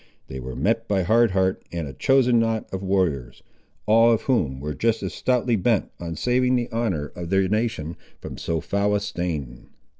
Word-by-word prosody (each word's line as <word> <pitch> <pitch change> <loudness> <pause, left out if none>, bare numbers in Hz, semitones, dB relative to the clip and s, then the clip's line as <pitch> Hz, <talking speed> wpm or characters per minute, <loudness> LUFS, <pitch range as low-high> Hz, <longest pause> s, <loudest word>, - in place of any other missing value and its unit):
They 65 - -6
were 65 0 -7
met 115 - 0
by 95 -2 +1
Hard 115 +5 +4
Heart 95 0 +1
and 85 -3 -4
a 70 - -8
chosen 125 - +3
knot 115 -1 0
of 95 - -3
warriors, 90 -11 -1 0.4
all 115 +2 +5
of 115 - +1
whom 75 - 0
were 75 +2 -4
just 110 +10 0
as - - -3
stoutly 125 -2 +1
bent 110 +1 +1
on 85 -1 -5
saving 125 +6 +2
the 120 0 -1
honour 95 -11 -2
of 85 -1 -6
their 95 0 +2
nation, 105 -6 -1 0.2
from - - -8
so 80 -1 -2
foul 100 +1 0
a - - +2
stain. 75 -11 -4
100 Hz, 190 wpm, -24 LUFS, 80-115 Hz, 0.4 s, all